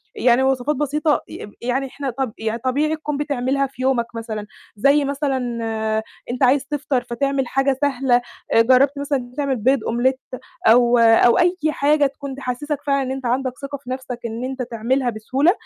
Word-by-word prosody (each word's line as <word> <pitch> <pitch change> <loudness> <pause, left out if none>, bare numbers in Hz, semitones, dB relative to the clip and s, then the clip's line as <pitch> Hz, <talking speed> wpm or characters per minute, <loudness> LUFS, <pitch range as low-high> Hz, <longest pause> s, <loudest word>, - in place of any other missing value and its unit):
يعني 250 +1 +3
وصفات 265 +2 +1
بسيطة 300 +2 +1
ي - - -8
إم 205 - -11
يعني 255 +3 -1
إحنا 275 +1 -5
طب 255 -2 -3
يعني 220 +1 -3
طبيعي 285 +6 0
تكون 300 -2 -4
بتعملها 275 -1 0
في 260 -1 -11
يومك 260 -2 +2
مثلًا، 220 -2 -5 0.3
زي 280 +7 +3
مثلًا 280 -1 -1 0.9
أنت 255 +2 -2
عايز 265 +2 +4
تفطر، 285 -3 -1
فتعمل 270 +2 -1
حاجة 270 +1 +1
سهلة. 265 -3 +2 0.3
آآ 225 - +6
جربت 260 +4 +4
مثلًا 285 0 0
إن - - -6
أنت 245 +1 -17
تعمل 280 -2 0
بيض 255 +4 +2
omelette 255 +3 -1 0.3
أو 240 +1 +6
أو 230 +1 +5
أي 355 0 +3
حاجة 295 0 +2
تكون 275 0 -5
تحسّسّك 280 +3 -4
فعلًا 275 0 +2
إن 260 - -3
أنت 265 -1 -5
عندك 255 +1 0
ثقة 280 0 -5
في 260 -2 -14
نفسك، 255 -1 -5
إن 230 +1 -4
أنت 260 0 -4
تعملها 245 +2 -1
بسهولة، 255 +9 +1
265 Hz, 185 wpm, -21 LUFS, 245-280 Hz, 0.9 s, آآ